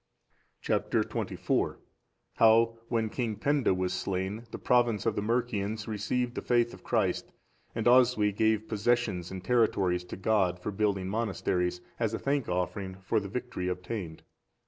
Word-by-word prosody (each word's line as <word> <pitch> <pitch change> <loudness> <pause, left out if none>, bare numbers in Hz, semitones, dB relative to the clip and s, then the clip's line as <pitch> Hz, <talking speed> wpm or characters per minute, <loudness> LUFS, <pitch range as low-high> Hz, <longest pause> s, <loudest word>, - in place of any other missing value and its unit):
Chap. - - 0
XXIV. - - 0 0.6
How 115 +1 +5
when 115 -2 0
King 115 -4 -2
Penda 140 +3 +1
was 90 0 0
slain, 95 +4 -3
the - - -6
province 120 -4 +2
of 115 -2 +1
the - - -1
Mercians 110 -2 -1
received 115 +3 -1
the - - -4
faith 120 -1 +2
of - - -13
Christ, - - 0 0.4
and 115 - -2
Oswy 120 -4 +5
gave 110 +1 +1
possessions 110 -5 0
and 95 -1 -7
territories 100 -7 +2
to - - -7
God, 95 -3 +2
for 105 - -4
building 100 -2 0
monasteries, 95 -4 -1 0.2
as 115 -1 0
a - - -2
thank 140 -3 -1
offering 95 +1 -2
for 95 +4 0
the 100 -1 -6
victory 125 -5 -4
obtained. 90 -2 -4
110 Hz, 150 wpm, -29 LUFS, 95-115 Hz, 0.6 s, How